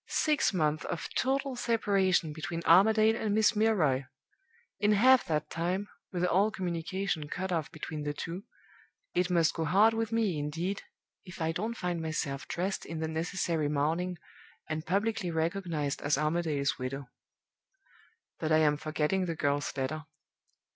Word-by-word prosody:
Six 305 -2 +2
months 155 -4 0
of 170 - -3
total 270 0 0
separation 195 -9 +1
between 165 +2 -4
Armadale 215 +5 +6
and 215 -3 -1
Miss 220 +1 +4
Milroy! 170 -12 +2 0.7
In 210 +1 +3
half 255 +5 +6
that 150 -1 -2
time 180 +5 -2 0.2
with 180 -1 0
all 195 +4 +3
communication 180 -3 -3
cut 190 +3 -3
off 165 -3 -1
between 155 -1 -6
the 145 0 -2
two 165 +5 -5 0.7
it 180 +1 +1
must 170 -3 +3
go 165 - -2
hard 200 +8 +5
with 225 -1 -2
me, 215 -8 +1
indeed, 165 +7 -2 0.4
if 180 -1 -11
I 160 0 0
don't 220 +8 -3
find 175 -2 -2
myself 155 -4 -3
dressed 190 +3 -2
in 165 - -6
the 160 - -1
necessary 160 -1 -1
mourning, 165 +5 0 0.5
and 155 0 -4
publicly 200 +1 0
recognized 160 -3 -1
as 145 -1 +1
Armadale's 150 -2 0
widow. 130 +1 -4 1.3
"But 160 -1 -1
I 155 - +6
am 150 -2 +3
forgetting 155 +4 0
the 165 - -2
girl's 145 -1 0
letter. 150 +4 -2
170 Hz, 150 wpm, -30 LUFS, 155-200 Hz, 1.3 s, Armadale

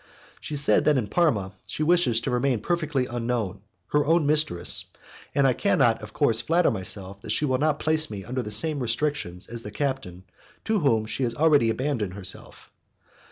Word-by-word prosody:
She 150 - -6
says 145 0 +4
that 150 -2 +3
in 120 - 0
Parma 110 - +1 0.2
she 155 - -3
wishes 155 -8 +3
to - - -3
remain 125 -2 0
perfectly 150 -6 -1
unknown, 120 -6 -3 0.3
her 150 0 +3
own 165 +1 +2
mistress, 150 - +2 0.5
and 140 - +3
I 130 - +4
cannot, 125 - +2
of 105 - -9
course, 120 -7 +2
flatter 170 -1 +2
myself 100 -1 -4
that - - -10
she 150 - +1
will 130 -2 0
not 150 0 +1
place 155 0 +2
me 100 -2 -6
under 125 +3 -3
the 105 - -6
same 150 +8 0
restrictions 120 -7 -2
as 115 0 -7
the 105 - -7
captain 105 -8 -4 0.4
to 220 0 +1
whom 115 - +2
she 110 +4 -5
has 120 -2 0
already 145 -7 +4
abandoned 115 -6 -2
herself. 95 -3 -4
130 Hz, 185 wpm, -25 LUFS, 110-150 Hz, 0.5 s, says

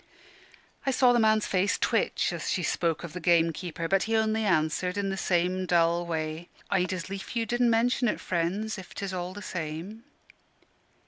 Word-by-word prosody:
I 275 - 0
saw 255 -2 +4
the 240 - +3
man's 215 -1 +3
face 195 +2 +1
twitch - - +1
as - - -4
she 180 - 0
spoke 165 +1 0
of 170 - -7
the 180 - -5
gamekeeper. 170 0 +1
But 195 +2 +2
he 225 - +2
only 220 0 +1
answered 180 +1 +1
in 200 -1 0
the 195 - -2
same 185 0 0
dull 170 0 +2
way. 160 0 -3 0.2
"I'd 185 -2 +1
as 185 -2 -4
lief 195 +4 -7
you 230 -1 +1
didn' 240 +2 +2
mention 240 +2 +2
it, - - -1
friends, 190 +5 -2
if 185 - -12
'tis 195 -1 -4
all 180 0 -4
the 205 - -8
same." 170 +7 -5
185 Hz, 185 wpm, -28 LUFS, 170-215 Hz, 0.2 s, saw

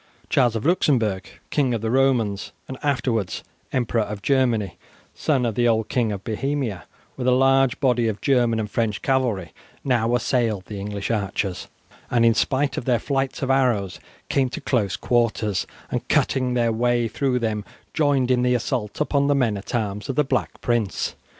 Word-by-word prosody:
Charles 120 -3 +3
of 115 - -3
Luxembourg, 115 - +2 0.2
King 130 -5 +1
of 110 - -3
the 110 0 -1
Romans, 120 -7 +1
and 130 - -6
afterwards 120 - -1 0.3
Emperor 120 -2 +1
of 105 -1 -5
Germany, 115 -10 +1 0.3
son 135 -5 0
of 115 - 0
the 120 +3 +2
old 110 -2 +1
King 120 -4 +1
of 100 -2 -5
Bohemia, 120 -3 -2 0.3
with 130 -1 -3
a - - +5
large 135 0 +3
body 125 -4 +2
of 105 -2 -2
German 120 -5 +2
and 110 - -2
French 110 -1 -1
cavalry, 120 - 0 0.3
now 120 -2 +2
assailed 115 -5 0
the 105 0 -7
English 100 +1 -4
archers, 100 -3 -2 0.4
and 120 -1 +3
in 115 - +6
spite 140 +3 0
of - - -3
their 125 -2 +3
flights 135 +1 -2
of 135 - +1
arrows 120 -8 +1 0.3
came 135 -2 +1
to - - -5
close 105 -7 0
quarters, 110 -3 0 0.2
and - - -3
cutting 130 -2 +1
their 120 -1 +2
way 120 +1 +1
through 130 +2 0
them 110 -3 -1 0.3
joined 140 -5 +2
in 125 -1 +3
the 125 0 +2
assault 120 -3 -2
upon 140 -2 +2
the 145 - +3
men 120 -6 +2
at 100 +5 -5
arms 105 -1 -2
of 135 - -1
the 150 - +3
Black 130 -2 -2
Prince. 115 -5 -1
120 Hz, 180 wpm, -23 LUFS, 105-130 Hz, 0.4 s, in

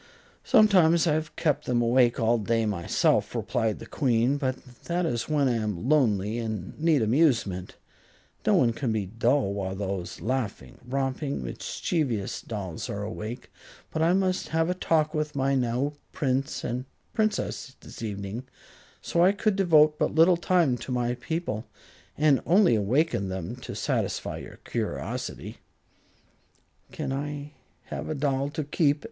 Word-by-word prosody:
"Sometimes 185 -8 +5
I 160 - +3
have 155 0 -2
kept 150 -4 0
them 125 -1 +1
awake 120 +1 +3
all 115 0 +3
day 115 +2 +1
myself," 95 -5 +1
replied 110 -2 0
the - - -9
Queen; 125 0 +1
"but 130 -3 -1 0.3
that 175 +1 0
is 120 -4 -2
when 145 -3 +2
I 125 - +2
am 105 -1 -3
lonely 115 -7 +2
and 110 -5 -4
need 155 -5 +3
amusement. 115 - +1 0.7
No - - +5
one 115 -1 +4
can 120 0 -2
be 110 -3 -1
dull 115 +2 +1
while 95 -1 -3
those 95 -2 -4
laughing, 115 +1 -3
romping, 135 - -2
mischievous 115 - -2
dolls 95 -7 -5
are 100 0 -3
awake. 110 +3 -6 0.4
But 160 - -2
I 165 +2 +4
must 185 -1 +1
have 165 +2 +1
a - - +1
talk 160 -3 +1
with 150 -1 -2
my 135 0 +1
new 130 +2 0 0.2
Prince 135 +1 -1
and 125 +1 -3 0.3
Princess 215 - -1
this - - -11
evening, 105 +3 -5 0.6
so 170 - +2
I 185 - +6
could 210 0 +1
devote 155 -5 +4
but - - 0
little 165 +3 +6
time 170 -7 +2
to 130 - -6
my 120 -1 0
people, 125 -2 -4 0.5
and 150 -2 +4
only 185 - +5
awakened 110 - +1
them 95 -3 -4
to - - -7
satisfy - - -2
your - - -10
curiosity." - - -4 1.3
"Can't 135 - -3
I 145 +1 -4 0.4
have - - -4
a 155 - -1
doll 140 -1 0
to 155 +1 -3
keep?" 145 0 +1
130 Hz, 155 wpm, -27 LUFS, 110-155 Hz, 1.3 s, I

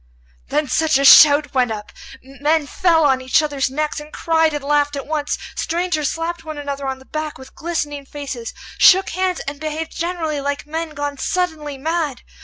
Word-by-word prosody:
Then 295 +1 0
such 315 +2 +2
a 275 - +1
shout 290 +1 +8
went 255 -2 +2
up! 210 -1 -6 0.3
Men 290 +4 0
fell 330 +1 +2
on 265 -2 +3
each 260 +5 +2
other's 285 -3 -1
necks, 300 +3 -2
and 300 +1 -11
cried 320 -1 +1
and 295 -2 -4
laughed 290 0 +1
at 275 - -5
once. 300 -1 -2 0.2
Strangers 335 -3 -1
slapped 330 0 -4
one 310 -1 -7
another 280 -1 -4
on 265 0 -3
the 265 - -17
back 310 +1 -5
with 260 0 -13
glistening 295 -4 -4
faces, 270 -6 -6 0.3
shook 380 +1 +6
hands, 370 0 -1
and 280 +1 -6
behaved 315 +1 -4
generally 330 -4 -2
like 285 +1 -3
men 320 +1 -5
gone 290 -1 -4
suddenly 315 -6 -2
mad. 310 -2 -2
295 Hz, 185 wpm, -20 LUFS, 280-320 Hz, 0.3 s, shout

